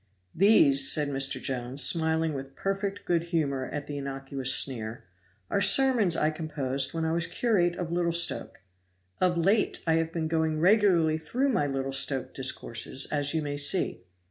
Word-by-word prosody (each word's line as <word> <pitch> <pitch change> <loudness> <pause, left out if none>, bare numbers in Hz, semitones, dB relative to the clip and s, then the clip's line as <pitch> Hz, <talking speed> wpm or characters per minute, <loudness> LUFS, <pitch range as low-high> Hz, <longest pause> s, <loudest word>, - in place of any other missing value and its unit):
"These," 270 - +4
said 150 -2 -1
Mr. 135 0 0
Jones, 130 +1 -1
smiling 160 -1 +1
with 135 0 -8
perfect 195 +1 -4
good 170 -1 0
humor 145 -6 -2
at 145 -1 -6
the 145 - -7
innocuous 135 -1 -3
sneer, 115 -4 +1 0.4
"are 200 - -1
sermons 210 -3 +4
I 155 - +1
composed 145 -4 -3
when 165 -1 -3
I 160 - -1
was 170 0 -1
curate 175 -3 0
of 175 -2 -5
Little 170 0 0
Stoke. 170 - 0 0.6
Of 180 -1 +1
late 195 +6 0
I 165 - +1
have 165 0 -2
been 165 -1 -3
going 160 -1 -1
regularly 175 -4 +3
through 250 - -2
my 185 - 0
Little 135 -1 -4
Stoke 135 -1 0
discourses, 130 0 -3
as 145 0 +1
you 160 - -1
may 145 -1 -4
see. 145 - +1
160 Hz, 170 wpm, -27 LUFS, 140-175 Hz, 0.6 s, These